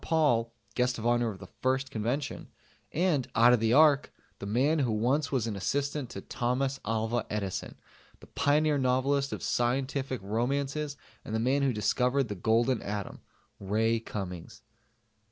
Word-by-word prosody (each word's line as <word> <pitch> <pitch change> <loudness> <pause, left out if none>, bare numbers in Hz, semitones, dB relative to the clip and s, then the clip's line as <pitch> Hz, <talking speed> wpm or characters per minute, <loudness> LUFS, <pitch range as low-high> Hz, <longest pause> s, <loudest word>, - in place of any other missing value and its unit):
Paul 120 -8 +2 0.2
(Guest 125 0 +1
of 115 - -6
Honor 120 -1 +2
of 100 - -7
the 95 - -10 0.2
first 130 0 0
Convention), 120 +6 -3 0.4
and 160 -6 +1
out 120 +2 +6
of 125 - +4
the 110 0 +1
Ark 150 0 +5 0.3
the 100 - -6
man 135 +9 +2
who 125 -5 +1
once 130 +8 +1
was 130 -5 +1
an 110 -3 -3
assistant 140 +6 -2
to 95 - -7
Thomas 130 +5 -1
Alva 115 +2 -1
Edison, 100 -3 -3 0.4
the - - -14
pioneer 150 0 +2
novelist 135 +2 +1
of - - -5
scientific 130 +1 -1
romances 140 +7 -1 0.3
and 110 - -4
the - - +1
man 130 +5 +2
who 135 -1 +2
discovered 125 +3 +1
the - - -2
Golden 115 +5 +1
Atom 100 -1 -5 0.4
Ray 110 +3 +1
Cummings. 95 -6 -7
125 Hz, 155 wpm, -29 LUFS, 110-140 Hz, 0.4 s, out